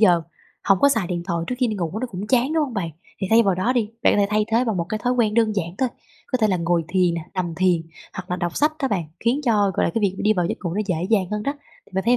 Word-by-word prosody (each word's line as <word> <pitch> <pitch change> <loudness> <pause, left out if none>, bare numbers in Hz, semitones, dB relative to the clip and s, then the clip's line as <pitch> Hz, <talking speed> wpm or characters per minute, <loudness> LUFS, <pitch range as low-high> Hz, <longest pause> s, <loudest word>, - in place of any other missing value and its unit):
giờ 175 -6 +5 0.4
hổng 195 -1 +4
có 280 - +6
xài 225 -9 +1
điện 175 -1 -3
thoại 170 -3 -1
trước 250 - -2
khi 255 - +3
đi 220 - -2
ngủ, 175 +2 -3
nó 255 - -1
cũng 200 -3 -6
chán, 255 +5 +2
đúng 320 -1 +2
hông 260 -5 -7
bạn? 180 -6 -2 0.3
Thì 190 - -2
thay 225 +1 +6
vào 195 -4 +2
đó 185 +8 +1
đi, 230 -5 0
bạn - - +5
có - - +1
thể 200 - +3
thay 210 0 +2
thế 230 +2 +2
bằng 225 -5 -1
một 170 - 0
cái 215 +1 -2
thói 245 0 +2
quen 225 -4 +1
đơn 225 -2 +3
giản 170 -2 -2
thôi, 260 - +2 0.4
có 255 - -1
thể 220 - +3
là 190 - +2
ngồi 170 -1 0
thiền 180 -1 +2
nè, 170 - -3
nằm 175 -3 -2
thiền, 180 -2 +2 0.3
hoặc 185 -1 -8
là 180 - 0
đọc 175 -1 -3
sách 300 +2 +3
đó 270 - +2
bạn, 195 -7 -1 0.2
khiến 240 +5 +1
cho, 210 -5 +3
gọi - - +1
là, - - 0
cái 225 - +1
việc 200 -3 +1
đi 215 - +3
vào 180 -4 0
giấc - - -3
ngủ 170 -1 -2
nó 210 - 0
dễ 180 -5 0
dàng 200 -5 +3
hơn 210 0 -2
đó 280 - -1 0.3
thì - - -24
bạn 190 +1 -1
thấy 240 +2 +4
205 Hz, 325 wpm, -22 LUFS, 180-230 Hz, 0.4 s, có